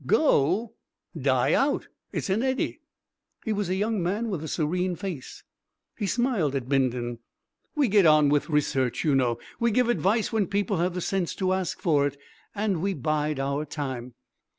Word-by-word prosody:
"Go?" 210 - +3 0.4
"Die - - +2
out. - - +1 0.2
It's 195 - -2
an 205 +4 +2
eddy." 260 0 -1 0.6
He 220 - 0
was 205 -3 -2
a 185 - +1
young 210 +1 0
man 205 +6 -1
with 165 -5 -3
a - - -4
serene 180 +4 -1
face. 170 -7 -7 0.5
He 205 - -2
smiled 215 - +1
at 130 -3 -2
Bindon. 125 -3 0 0.6
"We 290 -3 +3
get 200 -4 +5
on 155 -2 +6
with 145 +3 +1
research, 135 -5 +1
you 150 - +2
know; 125 -3 +2 0.2
we 235 - +3
give 240 +2 +2
advice 220 0 +1
when 210 -4 +1
people 200 -1 0
have 175 +2 0
the 180 - -2
sense 185 -1 -1
to 185 -1 0
ask 190 -3 -2
for 145 -4 +3
it. 140 0 -6 0.4
And 200 -5 0
we 195 +1 0
bide 150 +1 -1
our 140 +2 -1
time." 130 -5 -5
175 Hz, 175 wpm, -26 LUFS, 145-205 Hz, 0.6 s, on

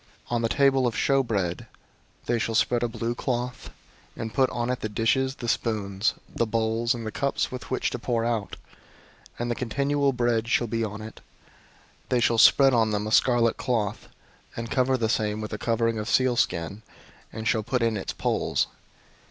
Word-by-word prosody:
004:007 - - -4
On 120 - +1
the 115 - 0
table 135 -1 +3
of 115 - -2
show 135 -1 +3
bread 100 -8 -2 0.6
they 120 -1 +1
shall 115 0 -1
spread 120 +2 +2
a 120 - +1
blue 115 0 -3
cloth, 125 0 -3 0.5
and 110 -1 -5
put 135 -2 +3
on 120 +1 -2
it 125 - -2
the 110 - -3
dishes, 130 +5 +1
the 120 - -6
spoons, 105 -3 0
the 115 - -1
bowls, 115 +1 0
and 115 -1 -6
the 110 - -3
cups 140 +5 -1
with 130 0 -7
which 130 - -1
to - - -4
pour 115 -2 -1
out; 115 -4 -2 0.8
and 120 0 -2
the - - +2
continual 140 +4 0
bread 120 -2 0
shall 120 - +2
be 115 0 -2
on 110 0 -5
it. 110 - -9 0.9
004:008 - - -34
They 125 - +2
shall 115 -1 +2
spread 135 +3 +7
on 115 -2 +3
them 105 0 -1
a 110 - -4
scarlet 120 -1 +3
cloth, 110 -5 -2 0.5
and 115 0 -5
cover 130 0 +2
the 115 -2 0
same 105 -1 0
with 110 0 -5
a 105 - -4
covering 115 -1 0
of 105 - -4
sealskin, 110 -7 +1 0.5
and 110 0 -5
shall 110 - +2
put 120 +3 -1
in 115 -1 +1
its 95 - -3
poles. - - 0
115 Hz, 195 wpm, -26 LUFS, 110-125 Hz, 0.9 s, spread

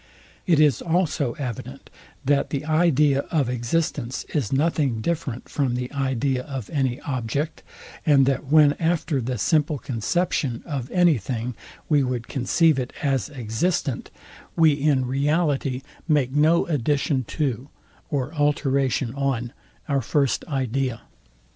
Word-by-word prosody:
It 165 -4 +4
is 150 -6 +4
also 160 -7 0
evident, 125 -5 -7 0.3
that 140 +1 +2
the 140 0 -3
idea, 155 -3 +3
of 145 -7 +1
existence 125 +1 -1
is 140 -10 -1
nothing 140 -4 +1
different 135 -2 -3
from 135 -4 -1
the 125 0 -3
idea 135 -1 0
of 130 -5 -7
any 135 -3 0
object, 140 +4 -3 0.4
and 145 -4 +5
that 135 +1 0
when 150 0 +6
after 160 -4 0
the 125 +1 -2
simple 150 +6 +1
conception 130 +1 -1
of 140 -6 -4
any 175 -7 +3
thing 120 +3 -4 0.3
we 150 -3 +3
would 125 -3 -2
conceive 140 +3 +2
it 125 - -4
as 135 -2 0
existent, 135 +3 -2 0.5
we 160 -2 +5
in 140 -2 +1
reality 140 -1 0 0.2
make 145 -5 +2
no 155 +4 +3
addition 145 -1 0
to 135 -2 -2 0.4
or 140 +1 -2
alteration 140 -4 +1
on 130 -4 -2 0.3
our 140 -2 +1
first 140 +2 +1
idea. 130 -4 -1
140 Hz, 130 wpm, -24 LUFS, 125-150 Hz, 0.5 s, when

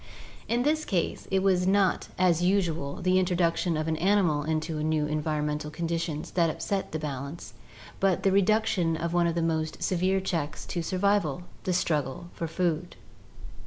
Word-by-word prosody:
In 240 +1 +1
this 310 +2 +1
case, 185 - -2
it 190 0 +1
was 185 -2 +3
not, 195 -1 +2
as 175 -2 +3
usual, 175 -6 +1
the 185 0 +4
introduction 175 -2 +1
of 155 +1 -2
an 160 -1 0
animal 180 -4 +2
into 155 0 -2
new 155 -1 +1
environmental 150 0 -2
conditions 165 -1 -3
that 170 -2 +2
upset 195 +4 -2
the 155 - -2
balance, 140 +1 -6 0.5
but 190 -2 +2
the 195 - +4
reduction 200 -4 +2
of 170 +1 -3
one 175 -1 +3
of 170 - -1
the 170 - 0
most 160 -1 -1
severe 185 +1 +1
checks 165 -6 -3
to 175 - -3
survival, 185 -3 +1 0.2
the 185 - +1
struggle 175 0 -1
for 165 - -4
food. 170 0 -1
170 Hz, 160 wpm, -28 LUFS, 155-185 Hz, 0.5 s, the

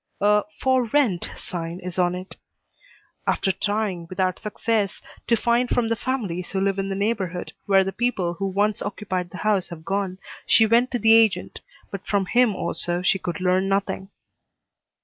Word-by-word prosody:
A 210 +1 +4
"For 260 -2 +2
Rent" 230 -7 +1
sign 170 0 -5
is 180 0 -5
on 175 0 +2
it. 185 +1 -8 0.9
After 190 - +2
trying, 205 -4 -2
without 185 -1 -1
success, 210 -1 -1 0.3
to 235 - +4
find 235 +2 +1
from 235 -2 +1
the 230 - +2
families 210 -9 -3
who 195 - -1
live 195 0 +1
in 195 0 -2
the 195 - -2
neighborhood 195 -4 -2
where 195 -1 +5
the 195 - -3
people 195 -7 -1
who 195 +3 -3
once 205 +2 0
occupied 190 -3 -3
the 180 - -9
house 205 -4 +1
have 165 -2 -9
gone, 195 0 -1 0.3
she 225 - +6
went 235 +3 +3
to 245 - -1
the 225 0 +5
agent, 225 -3 +3 0.3
but 195 -2 -7
from 200 -1 +1
him 240 0 +3
also 175 0 -2
she 190 +1 +2
could 175 -1 -4
learn 185 +1 +2
nothing. 195 -1 -1
195 Hz, 175 wpm, -24 LUFS, 185-220 Hz, 0.9 s, she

